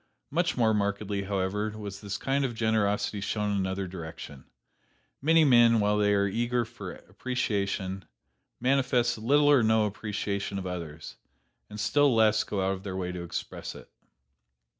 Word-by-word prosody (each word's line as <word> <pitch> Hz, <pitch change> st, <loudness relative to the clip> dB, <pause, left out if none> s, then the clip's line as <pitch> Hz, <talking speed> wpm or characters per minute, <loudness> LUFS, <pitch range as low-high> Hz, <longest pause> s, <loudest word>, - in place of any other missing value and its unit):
Much 170 Hz, +1 st, 0 dB
more 110 Hz, -3 st, +3 dB
markedly, 100 Hz, -1 st, -1 dB
however, 105 Hz, +2 st, -2 dB
was 100 Hz, -2 st, -7 dB
this 100 Hz, -2 st, -4 dB
kind 135 Hz, +5 st, 0 dB
of 125 Hz, -3 st, -2 dB
generosity 110 Hz, -2 st, 0 dB
shown 105 Hz, +1 st, -1 dB
in 100 Hz, -, 0 dB
another 95 Hz, 0 st, -2 dB
direction. 80 Hz, -5 st, -9 dB, 0.8 s
Many 160 Hz, +2 st, +5 dB
men, 120 Hz, -4 st, +6 dB
while 105 Hz, 0 st, +2 dB
they 105 Hz, 0 st, +3 dB
are 100 Hz, 0 st, +2 dB
eager 120 Hz, +3 st, 0 dB
for -, -, -8 dB
appreciation, 100 Hz, -6 st, -3 dB, 0.5 s
manifest 125 Hz, -2 st, +2 dB
little 145 Hz, +6 st, +4 dB
or 140 Hz, -4 st, +6 dB
no 110 Hz, -1 st, +3 dB
appreciation 100 Hz, -1 st, -3 dB
of 95 Hz, -, -4 dB
others, 85 Hz, -4 st, -6 dB, 0.5 s
and 105 Hz, -, -8 dB
still 140 Hz, +4 st, +3 dB
less 110 Hz, -1 st, +4 dB
go 95 Hz, -2 st, -2 dB
out 95 Hz, -, +1 dB
of 95 Hz, -, -7 dB
their 95 Hz, -1 st, -5 dB
way 90 Hz, -1 st, -3 dB
to 90 Hz, -1 st, -5 dB
express 85 Hz, -, -6 dB
it. -, -, -13 dB
105 Hz, 160 wpm, -28 LUFS, 95-120 Hz, 0.8 s, men